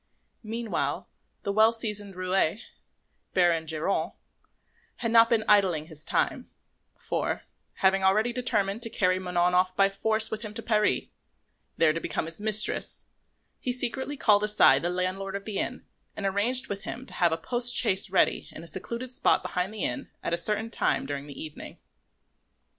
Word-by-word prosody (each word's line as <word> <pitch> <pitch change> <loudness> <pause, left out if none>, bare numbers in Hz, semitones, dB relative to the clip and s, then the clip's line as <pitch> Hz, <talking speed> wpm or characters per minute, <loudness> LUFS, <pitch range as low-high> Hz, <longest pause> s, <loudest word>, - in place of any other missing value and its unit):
Meanwhile 225 0 -3 0.4
the 200 - -1
well 220 +2 +5
seasoned 210 -4 -4
roué, 185 +1 0 0.8
Baron 170 -3 +2
Geronte, 160 +5 -2 0.8
had 230 -2 -3
not 230 0 +6
been 225 -2 +2
idling 190 -7 +3
his 155 -2 -8
time; - - -1 0.5
for, - - -3 0.3
having 190 0 +2
already 215 +5 +3
determined 220 -4 -1
to 230 - -2
carry 185 -3 +1
Manon 180 -1 0
off 185 0 +2
by 195 0 +5
force 220 +2 +1
with 220 - -4
him 215 -2 -8
to 230 - -6
Paris, 215 -2 +2 0.7
there 160 -2 +4
to 165 - -2
become 160 - -3
his 165 +4 -5
mistress, 215 0 +3 0.5
he 250 - -2
secretly 265 +3 -2
called 210 -5 +4
aside 210 -10 +5
the 175 - 0
landlord 185 +2 -2
of 200 - -5
the 210 -3 -3
inn - - -4 0.3
and 205 - -4
arranged 230 +7 +1
with 200 -1 -5
him 250 +4 -7
to - - -10
have 175 -2 +2
a 160 - 0
post 240 +8 +1
chaise 195 -4 +4
ready 190 - +2
in 160 - -10
a - - -11
secluded 235 +8 -4
spot - - +2
behind 180 +2 -2
the 215 - -5
inn 280 - -2
at - - -2
a - - +5
certain 215 +4 0
time - - 0
during 140 0 -5
the 140 - -9
evening. 155 -1 -8
200 Hz, 170 wpm, -27 LUFS, 180-225 Hz, 0.8 s, not